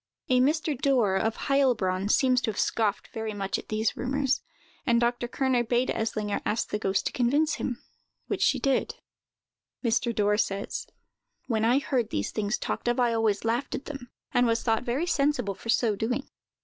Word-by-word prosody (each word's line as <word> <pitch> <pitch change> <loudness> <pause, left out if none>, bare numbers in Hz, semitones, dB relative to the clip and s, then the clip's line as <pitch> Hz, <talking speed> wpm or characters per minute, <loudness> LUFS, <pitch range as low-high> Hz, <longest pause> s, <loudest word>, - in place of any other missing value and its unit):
A 255 -1 +4
Mr. 305 +3 +2
Dorr, 245 -7 +2
of 220 +3 0
Heilbronn, 215 -9 +2
seems 255 +1 +4
to - - -1
have 210 - -4
scoffed 215 -3 0
very 220 -1 -4
much 195 -1 -2
at - - -12
these 215 0 0
rumors, 270 +1 0 0.4
and 235 -1 +3
Dr. 240 0 0
Kerner 255 -1 +1
bade 240 +2 +1
Eslinger 215 -2 -2
ask 220 - -1
the 210 - -2
ghost 195 -2 0
to - - 0
convince 285 +6 +2
him, 245 -2 -4 0.4
which - - -3
she - - +4
did. 275 -1 0 0.9
Mr. 235 +1 +2
Dorr 210 -2 +2
says: 200 -1 -2 0.6
"When 220 -3 0
I 240 +3 +4
heard 260 -5 0
these 100 - -2
things 215 +1 -1
talked - - -4
of, 240 +1 +1
I 240 -2 +3
always 220 -2 +1
laughed 235 +4 0
at 270 - -6
them, 275 -5 -8 0.2
and 245 0 +4
was 230 0 +1
thought 225 -2 +2
very 255 +6 -1
sensible 275 - +1
for 230 - -11
so 230 -2 +3
doing. 245 +6 -2
235 Hz, 185 wpm, -27 LUFS, 215-260 Hz, 0.9 s, A